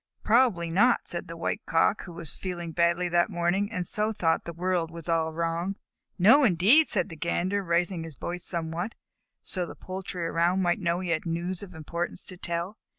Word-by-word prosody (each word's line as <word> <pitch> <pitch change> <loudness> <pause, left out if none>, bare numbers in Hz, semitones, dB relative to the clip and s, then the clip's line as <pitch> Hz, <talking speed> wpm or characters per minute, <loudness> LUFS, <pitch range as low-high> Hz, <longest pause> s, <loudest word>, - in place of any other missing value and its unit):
"Probably 220 -8 +3
not," 235 +8 +4
said 175 +1 -3
the 165 0 -8
White 205 +5 -2
Cock, 165 +5 +2
who 175 - -9
was 165 -2 -4
feeling 175 -3 -5
badly 170 +2 +2
that 175 +2 +3
morning, 190 +3 0
and 180 -5 -2
so 210 +5 -1
thought 165 -6 0
the 170 - -4
world 175 -1 -1
was 165 0 -10
all 165 -1 +1
wrong. 170 +4 -2 0.4
"No 225 +11 +6
indeed," 220 - +5
said 190 -2 +1
the 165 - -8
Gander, 180 +5 -1
raising 170 0 0
his 165 -3 -9
voice 175 +6 -5
somewhat, 170 +4 -3 0.5
so - - +3
that 175 - 0
the - - -9
poultry 185 -2 -4
around 170 +3 +1
might 175 -1 +1
know 170 -1 0
he 180 - -4
had 170 +1 -1
news 170 +2 -2
of 185 -4 -10
importance 170 +3 -4
to 185 - -7
tell. 175 +4 -4
175 Hz, 200 wpm, -27 LUFS, 170-190 Hz, 0.5 s, No